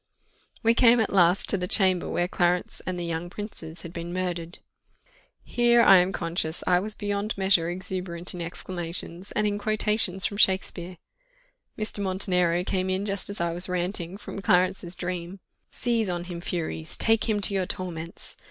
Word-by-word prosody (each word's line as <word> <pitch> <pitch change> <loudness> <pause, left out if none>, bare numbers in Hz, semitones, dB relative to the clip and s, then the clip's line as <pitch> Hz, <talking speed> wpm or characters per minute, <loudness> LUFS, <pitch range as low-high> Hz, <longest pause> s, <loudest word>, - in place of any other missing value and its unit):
We 230 +1 +5
came 235 0 +5
at 220 - 0
last 180 0 +4
to 200 - +2
the 180 - -2
chamber 185 -2 +3
where 175 0 0
Clarence 175 0 0
and 185 -1 -2
the 175 - -3
young 170 +1 -3
princes 175 -5 -7
had 170 - -9
been 170 0 -5
murdered. 175 -2 -3 0.9
Here, 240 -1 +4
I 195 - +8
am 180 +1 +3
conscious, 165 -3 -2
I 180 -1 +4
was 210 +3 -4
beyond 205 0 -3
measure 190 -4 +2
exuberant 180 -1 -1
in 180 - -6
exclamations, 175 +1 -5
and 210 - +1
in 205 0 0
quotations 210 -3 +1
from 200 - -2
Shakspeare. 185 -2 +1 0.8
Mr. 215 -1 -3
Montenero 180 -3 +1
came 185 0 -1
in 190 +2 -1
just 200 -1 0
as 200 - -5
I 170 0 0
was 180 +2 -3
ranting, 180 0 -2
from 200 - -8
Clarence's 180 -1 +2
dream 180 +1 -5 0.3
"Seize 230 -4 -1
on 175 -1 -2
him, 175 -1 -7
furies! 160 - -4
take 225 0 +2
him 210 -1 +1
to 200 - +4
your 190 -2 0
torments! 170 -2 -4
185 Hz, 170 wpm, -26 LUFS, 175-200 Hz, 0.9 s, I